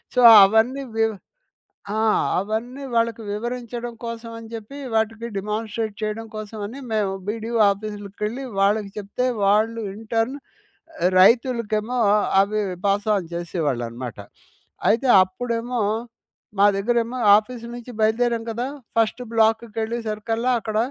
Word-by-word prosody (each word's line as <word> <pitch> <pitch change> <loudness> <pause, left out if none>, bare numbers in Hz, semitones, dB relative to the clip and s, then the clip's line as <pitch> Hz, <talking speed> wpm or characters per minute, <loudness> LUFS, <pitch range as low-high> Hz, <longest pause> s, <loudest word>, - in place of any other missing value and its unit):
So 250 - +4 0.2
అవన్నీ 225 +7 +3
వివ్ 225 0 +2 0.8
ఆ! - - +1 0.4
అవన్నీ 230 +8 -3
వాళ్ళకి 230 0 +1
వివరించడం 240 +1 -4
కోసమని 230 -1 -7
జెప్పి 225 +5 -8 0.2
వాటికి 220 +1 0
డిమాన్‌స్ట్రేట్ 215 +1 -3
చేయడం 215 +1 -3
కోసమని 215 +4 -6
మేము 205 -3 +1 0.2
బీడీఓ 230 +2 -2
ఆఫీసులకెళ్లి 210 +4 -5 0.2
వాళ్ళకి 205 0 +2
చెప్తే 205 +5 -2 0.2
వాళ్ళు 220 +3 +2
ఇన్‌టర్న్ 225 +4 -1 0.7
ఆహ్, 180 - +4
రైతులకేమో 235 +1 +3 0.4
అవి 210 +2 +1 0.3
పాస్ 205 +2 +1
ఆన్ 180 -4 -4
జేసేవాళ్ళనమాట. 130 - -3 0.7
అయితే 245 +4 +2 0.2
అప్పుడేమో 235 +4 -3 0.8
మా 200 - +6
దగ్గరేమో 235 +4 0 0.2
ఆఫీస్ 235 +2 -7
నుంచి 245 +1 -10
బయలుదేరాం 230 +1 +1
కదా! 240 +3 -3 0.3
ఫస్ట్ 230 +2 +1
బ్లాక్ 225 +1 +3
కెళ్ళే 225 +2 -2
సరికల్లా 225 +3 -1
అక్కడ 215 -1 -4
225 Hz, 110 wpm, -23 LUFS, 210-235 Hz, 0.8 s, మా